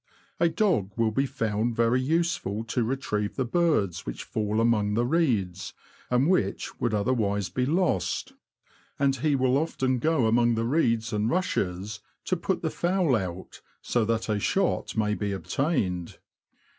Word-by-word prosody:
A 170 0 +4
dog 165 - +1
will 115 -1 +2
be 135 +5 +1
found 115 -3 -1
very 115 +2 +2
useful 145 - 0
to 115 +2 -1
retrieve 110 -4 -2
the 130 - -1
birds 115 - +1
which - - -6
fall 110 0 -1
among 105 -3 +2
the 120 +2 +2
reeds, 110 - 0 0.3
and 125 +3 +3
which 185 +1 0
would 120 - 0
other 105 +4 +1
wise 100 -4 0
be 125 0 -1
lost; 160 - 0 0.6
and 135 -1 +2
he 145 +2 +1
will 130 0 +2
often 130 -5 0
go 155 -2 +2
among 120 +1 +3
the 115 0 -1
reeds 115 -5 +1
and 105 +1 +1
rushes, 105 - -1 0.3
to 185 - +1
put 180 +1 -2
the 160 - 0
fowl 175 -6 +1
out, 95 -3 -5 0.2
so 120 - +1
that 115 0 -1
a 105 -2 0
shot - - 0
may 105 -1 +1
be 105 -1 -2
obtained. 95 - -1
115 Hz, 160 wpm, -27 LUFS, 105-140 Hz, 0.6 s, A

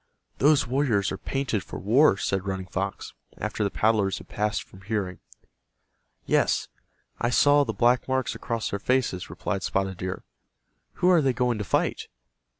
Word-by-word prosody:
"Those 145 +1 +4
warriors 120 -6 +1
are 95 - -3
painted 135 -7 -2
for - - -8
war," 115 +2 +4
said 95 -1 -2
Running 95 -1 -3
Fox, 95 +1 -4 0.2
after - - -2
the 100 - +1
paddlers 105 -2 +1
had - - -11
passed 105 0 -1
from 95 - -17
hearing. 95 -2 -3 1.1
"Yes, - - +1 0.5
I 120 - +1
saw 145 +3 +5
the 115 - -2
black 120 +4 +2
marks 130 -1 0
across 115 -1 -3
their 100 - -2
faces," 125 -6 0
replied 100 - -3
Spotted 95 -1 -1
Deer. 95 0 -4 0.7
"Who 180 - +2
are 175 -3 +5
they 135 -3 +2
going 125 -2 0
to - - -1
fight?" 95 - 0
110 Hz, 160 wpm, -26 LUFS, 95-130 Hz, 1.1 s, saw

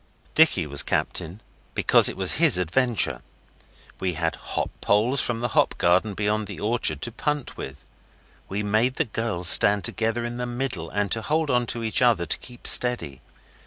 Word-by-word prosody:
Dicky 155 - +3
was 70 -1 +2
captain, 90 +4 -3 0.3
because - - +4
it - - -8
was - - +3
his - - +5
adventure. 90 - 0 0.8
We 95 -1 -2
had 80 0 -2
hop - - -5
poles 115 +7 +2
from 115 -1 -3
the 120 - -2
hop - - +1
garden 95 +4 +1
beyond 105 +1 -2
the - - -9
orchard 105 -9 -1
to 120 - -3
punt 145 +4 -4
with. 65 +1 -8 0.7
We 100 +2 -3
made 110 +5 0
the 160 - -1
girls 110 -6 -3
stand 100 +2 +7
together 115 +4 -1
in 120 0 -6
the 125 0 -4
middle 120 -9 -5
and 105 -1 -2
hold 150 +7 -1
on 125 -1 0
to 115 0 -4
each 110 +2 -1
other 115 -8 +2
to 80 - +1
keep 120 -1 -14
steady. 120 - +3
110 Hz, 175 wpm, -23 LUFS, 90-120 Hz, 0.8 s, stand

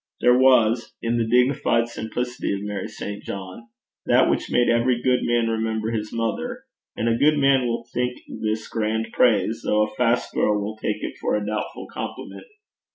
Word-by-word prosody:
There 125 0 +5
was 125 -3 +3
in 115 +1 0
the 115 - 0
dignified 125 -1 +2
simplicity 120 -1 -3
of 100 - -6
Mary 105 -2 -4
St. 105 0 -7
John 95 +4 -8 0.4
that - - +5
which - - -2
made 120 0 +3
every 120 +1 +2
good 125 0 +2
man 120 -1 +1
remember 110 0 -1
his 110 -2 -3
mother; 240 - -3 0.3
and 115 - -1
a 115 - +3
good 150 +2 +4
man 135 -3 +3
will 115 0 -3
think 125 0 -1
this 110 0 -3
grand 110 0 -2
praise, 115 -1 +2
though 105 0 +2
a 105 - -10
fast 120 +1 +1
girl 105 -1 +2
will 105 +1 -4
take 105 -1 -3
it - - -5
for - - +1
a 105 -1 -2
doubtful 105 +1 -4
compliment. - - -7
115 Hz, 180 wpm, -23 LUFS, 110-125 Hz, 0.4 s, There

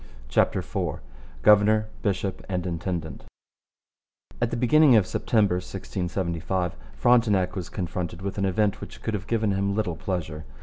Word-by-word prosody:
CHAPTER - - +2
IV - - -3 0.4
GOVERNOR, 105 +1 +5
BISHOP, 95 -1 -2
AND 90 -2 -2
INTENDANT 85 -2 -4 1.2
At 120 - +2
the 120 - -3
beginning 135 +2 +5
of 105 -4 +5
September 100 -2 +1
1675 90 -1 -3 0.2
Frontenac 105 -7 +3
was 90 -4 -4
confronted 90 -1 -4
with 100 +1 -3
an 100 - +1
event 100 +2 +1
which - - -10
could 110 - -2
have 100 -2 -4
given 110 -3 +1
him 100 0 0
little 100 -6 -1
pleasure. 80 -5 -4
95 Hz, 140 wpm, -26 LUFS, 90-105 Hz, 1.2 s, GOVERNOR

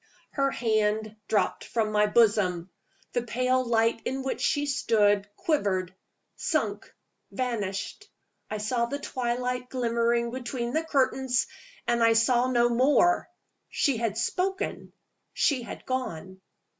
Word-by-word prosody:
Her 275 -1 +1
hand 215 -3 0
dropped 210 -3 0
from 220 -2 -1
my 210 0 +3
bosom. 205 -6 +2 0.4
The 245 - +1
pale 255 +2 +1
light 230 -1 +1
in 265 0 -3
which 265 - -3
she 290 0 +1
stood 205 -7 +2
quivered, 195 - 0 0.4
sunk, - - -2 0.4
vanished. 230 - -3 0.4
I 215 - -3
saw 235 +3 0
the 280 - -3
twilight 250 -2 -2
glimmering 235 -1 0
between 245 -1 -4
the 315 - +1
curtains 265 -4 +1 0.4
and 235 0 +2
I 230 0 +6
saw 240 +2 +3
no 240 -1 +3
more. 280 +8 +3 0.4
She 275 -5 +1
had 220 -2 -1
spoken. 375 - -2 0.4
She 275 -4 +2
had 235 - -9
gone. 190 -8 -4
235 Hz, 125 wpm, -27 LUFS, 215-255 Hz, 0.4 s, I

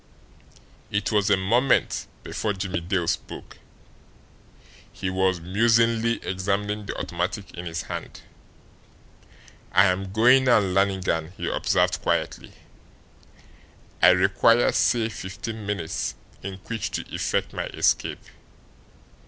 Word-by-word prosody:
It 100 +1 -1
was 105 -2 +2
a 100 - +4
moment 120 +8 +1 0.2
before 105 - -2
Jimmie 95 -3 -3
Dale 90 0 -1
spoke; 90 - -4 1.3
he 95 - -4
was 95 -1 +1
musingly 115 +5 +2
examining 100 +2 -2
the - - -5
automatic 100 -3 -3
in 90 0 -7
his 85 0 -4
hand. - - -7 1.5
"I 95 - +6
am 95 0 0
going 125 +5 +5
now, 125 -2 +6
Lannigan," 95 -4 0
he - - -4
observed - - +1
quietly. - - -2 1.5
"I 90 - +8
require, 95 +6 +4
say, 115 -3 +2
fifteen 110 +1 -7
minutes 95 -6 -3 0.3
in 95 0 -6
which 110 -4 -3
to - - -2
effect - - -1
my - - -3
escape. - - 0
100 Hz, 110 wpm, -25 LUFS, 95-110 Hz, 1.5 s, I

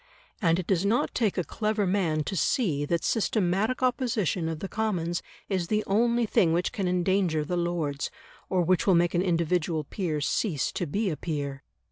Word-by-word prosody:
And 165 -3 +3
it 180 - -3
does 185 -1 +1
not 215 +4 +1
take 220 -5 0
a 180 - +1
clever 215 +2 -1
man 175 -5 +1
to 190 - -4
see 155 - +1
that 170 +2 -1
systematic 220 +2 +1
opposition 225 - 0
of 160 - -3
the 195 - -5
Commons 180 -6 -1 0.3
is 185 -4 -1
the 215 +2 +1
only 235 +4 +2
thing 170 -6 +3
which 175 +2 0
can 195 -3 -2
endanger 180 -3 +1
the 180 - -2
Lords, 170 -5 -1 0.4
or 185 -2 +2
which 180 +2 +2
will 190 - +6
make 170 0 +3
an 175 - +2
individual 170 -2 0
peer 160 0 -3
cease 150 - 0
to 175 - -3
be 200 +6 0
a 155 - -4
peer. 140 -4 -4
180 Hz, 185 wpm, -27 LUFS, 165-205 Hz, 0.4 s, will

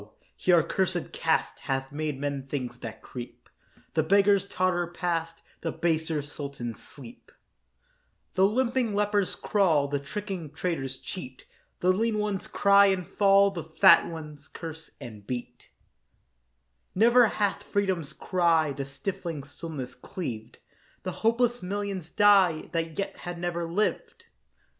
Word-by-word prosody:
here 175 -3 +4
accursèd 180 0 -1
caste 160 0 0
Hath 135 0 -3
made 150 -1 -3
men 140 -1 -3
things 125 -3 -4
that 110 -2 -8
creep; 125 -1 -9 0.5
The 160 - +3
beggars 200 +3 +4
totter 180 -2 0
past, 165 -1 -3 0.2
The 165 - -2
baser 160 -2 0
sultans 140 -5 -6
sleep; 235 - -13 1.0
The 190 +1 +5
limping 240 0 0
lepers 205 -1 +1
crawl, 165 -9 +2
The 145 0 0
tricking 190 +2 -5
traders 150 -6 -2
cheat; 130 -7 -8 0.4
The 185 +1 +4
lean 220 +2 0
ones 210 -2 -2
cry 200 0 +5
and 190 -2 +1
fall, 200 0 +4
The 170 -4 -5
fat 190 -4 +6
ones 150 -3 -8
curse 160 -1 -8
and 105 -4 -10
beat; 125 -1 -6 1.3
Never 235 +4 +6
hath 205 -2 0
freedom's 190 -7 -1
cry 165 -3 +2
The 140 0 -4
stifling 165 +1 -5
stillness 140 -2 -7
cleaved; 125 -4 -6 0.5
The 185 - -3
hopeless 235 +4 +1
millions 195 -2 -4
die 195 -5 +4
That 165 -2 -2
yet 195 0 -3
have 175 -1 -6
never 170 -1 -3
lived. 210 +5 -1
170 Hz, 130 wpm, -27 LUFS, 145-200 Hz, 1.3 s, fat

